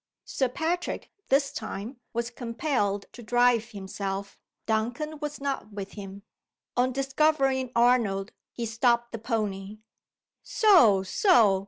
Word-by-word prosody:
Sir 260 -2 0
Patrick, 330 +7 -2 0.2
this 275 +1 +3
time, 220 +3 -6
was 235 +1 -2
compelled 230 -4 -1
to 245 - -10
drive 240 0 +3
himself 195 -1 -5 0.3
Duncan 245 +8 -1
was 295 0 -5
not 275 -6 -3
with 200 -1 -6
him. 200 -1 -9 0.5
On 250 +1 +2
discovering 270 -1 +1
Arnold, 235 -5 +3 0.2
he 235 - -4
stopped 235 +1 +1
the 230 - -5
pony. 210 -3 -3 0.6
"So! 245 - +5
so!" 210 - +4
235 Hz, 120 wpm, -27 LUFS, 205-270 Hz, 0.6 s, So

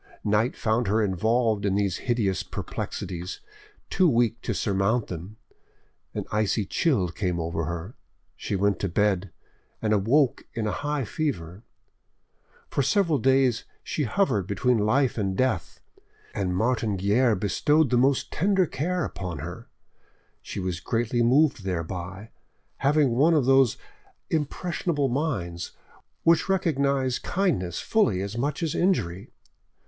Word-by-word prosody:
Night 105 +4 +1
found 110 0 0
her 110 +3 +2
involved 110 +3 +1
in 100 -1 +1
these 100 -3 0
hideous 105 -6 +1
perplexities, 90 0 -5 0.5
too 185 -3 +4
weak 120 -3 +1
to - - -3
surmount 100 +3 0
them; 90 +5 -7 0.8
an - - -3
icy 105 0 +1
chill 105 - +1
came 90 0 -2
over 85 0 -2
her, 85 - -5 0.4
she - - -3
went 100 0 +1
to 100 - -1
bed, 100 0 +1 0.5
and 110 -1 +1
awoke 120 +7 +2
in 115 -2 -1
a 105 - 0
high 145 -2 -2
fever. 100 - -3 1.1
For - - -1
several 165 +1 +2
days 130 -3 +2 0.2
she 150 - -2
hovered 115 - +1
between 110 +5 +1
life 120 +4 +2
and 95 -2 -1
death, 130 - -1 0.5
and 90 -3 -1
Martin 110 -2 0
Guerre 105 +5 +3
bestowed 130 - +2
the - - +4
most 135 +2 +2
tender 190 +2 +2
care 175 +5 -2
upon 90 -4 -5
her. 85 +5 -8 0.7
She - - -6
was 90 -2 -3
greatly 120 +3 0
moved 135 0 +3
thereby, 90 +3 -4 0.5
having 140 -1 +3
one 150 +8 +4
of 145 -5 +3
those 135 -3 +4 0.5
impressionable 155 -1 -1
minds 100 - -2 0.5
which 165 +2 +3
recognise 140 -8 +1
kindness 125 - -1
fully 105 - +2
as 100 +2 -5
much 145 +7 -2
as 160 - -1
injury. 95 - 0
115 Hz, 135 wpm, -26 LUFS, 95-140 Hz, 1.1 s, too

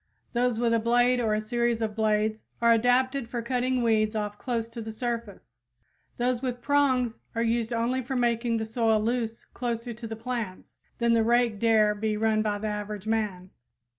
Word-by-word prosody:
Those 245 -1 +1
with 235 0 +2
a 230 - +3
blade 245 +2 +3
or 220 -3 +1
a - - 0
series 235 +1 0
of 220 -2 -2
blades 215 0 +1 0.2
are 235 0 +4
adapted 245 +2 +2
for 235 -1 -3
cutting 250 0 0
weeds 220 -1 +2
off 210 -1 -3
close 235 -3 -2
to 230 0 -7
the 220 0 -6
surface; 220 - -5 0.6
those 245 0 0
with 250 -2 -3
prongs 260 -3 +1 0.2
are 230 - +1
useful 230 0 0
only 245 +3 0
for 265 +2 -4
making 235 -1 +1
the 220 - -2
soil 225 -1 +2
loose 230 0 -2
closer 235 -1 -3
to 230 +1 -8
the 225 - -5
plants 225 -4 -5 0.2
than 235 -1 +2
the 230 - +4
rake 235 -2 +2
dare 220 -2 +4
be 210 0 -1
run 220 0 +2
by 210 -1 0
the 210 - -6
average 210 -1 -4
man. 210 -5 -2
230 Hz, 190 wpm, -27 LUFS, 220-245 Hz, 0.6 s, are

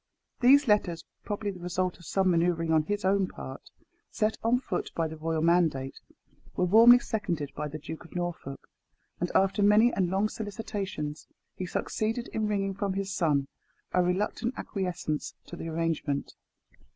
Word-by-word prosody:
These 270 +2 +6
letters, 200 -6 +2 0.2
probably 205 -1 -2
the 185 - -10
result 180 +1 -2
of 175 - -14
some 190 -1 +2
manoeuvring 165 -1 +1
on 160 -1 +5
his 205 +1 -2
own 195 0 +3
part, 65 - -9 0.4
set 215 +1 0
on 235 +2 +3
foot 260 - -3
by 165 -1 0
the 160 - -7
royal 160 0 -1
mandate, 165 -6 +2 0.6
were 180 - +2
warmly 230 +6 +8
seconded 185 - -3
by 150 - -3
the 150 +1 -6
Duke 160 +2 -8
of 165 - -15
Norfolk, 175 -6 -5 0.5
and 175 - -1
after 195 +1 +3
many 210 +4 +5
and 185 -3 +1
long 195 +3 +1
solicitations, 200 -8 -5 0.3
he 185 - -4
succeeded 225 +6 -2
in 220 -1 -1
wringing 195 -2 0
from 200 0 -2
his 195 0 -3
son 145 -7 +1 0.4
a 180 - +3
reluctant 205 +7 -1
acquiescence 180 -6 -3
to - - -8
the 165 - -6
arrangement. 160 -3 -2
185 Hz, 165 wpm, -28 LUFS, 165-205 Hz, 0.6 s, warmly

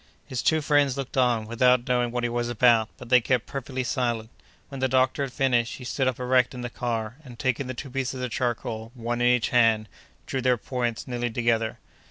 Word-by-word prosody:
His 130 - -3
two 160 -1 +2
friends 145 -3 +2
looked 135 -2 -5
on, 120 -4 +2
without 125 +2 +3
knowing 125 -1 +1
what 120 0 -3
he 120 - +1
was 120 0 -1
about, 115 -2 +4
but 125 -3 -11
they 125 0 +6
kept 125 0 0
perfectly 130 -1 -4
silent. 120 -3 -1 0.4
When 135 -2 -7
the 130 - +2
doctor 130 +2 +2
had 135 -2 -2
finished, 120 -3 +1
he 125 - -10
stood 130 +2 -1
up 130 -1 -1
erect 125 0 +2
in 125 - -6
the 120 -1 -5
car, 115 -1 -3
and, 125 -4 -12
taking 130 +2 -1
the 130 - -5
two 135 +2 -7
pieces 130 0 -2
of 125 -1 -3
charcoal, 120 -2 -3
one 120 0 -3
in 120 - +4
each 125 -1 +3
hand, 115 -3 +3 0.4
drew 130 - -2
their 125 -1 +3
points 120 0 -3
nearly 120 -1 -2
together. 115 -1 0
125 Hz, 220 wpm, -26 LUFS, 120-130 Hz, 0.4 s, they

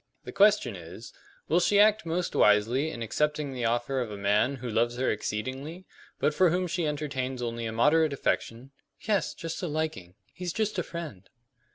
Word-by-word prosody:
The - - -8
question 200 - +4
is, 90 +6 -10 0.3
Will 170 - +3
she 200 +3 +3
act 215 -2 +4
most 175 +2 -1
wisely 115 +8 +3
in 120 -7 -5
accepting 150 +3 -1
the 125 -2 -3
offer 120 +3 0
of 120 - -3
the 105 - -7
man 105 +7 +2
who 125 -1 -7
loves 120 +1 0
her 130 - +1
exceedingly, 130 - -4 0.3
but 150 - +2
for 185 +3 +4
whom 180 +3 0
she 175 -2 -1
entertains 135 -4 -3
only 115 -1 -3
a - - -3
moderate 150 +7 +3
affection 130 -2 -2
" - - -41
"Yes; 210 -3 0
just 165 -2 -5
a 180 - -2
liking. 150 - -3 0.2
He's 180 -2 -5
just 215 -3 -1
a - - 0
friend." 155 - -8
140 Hz, 190 wpm, -28 LUFS, 115-170 Hz, 0.3 s, question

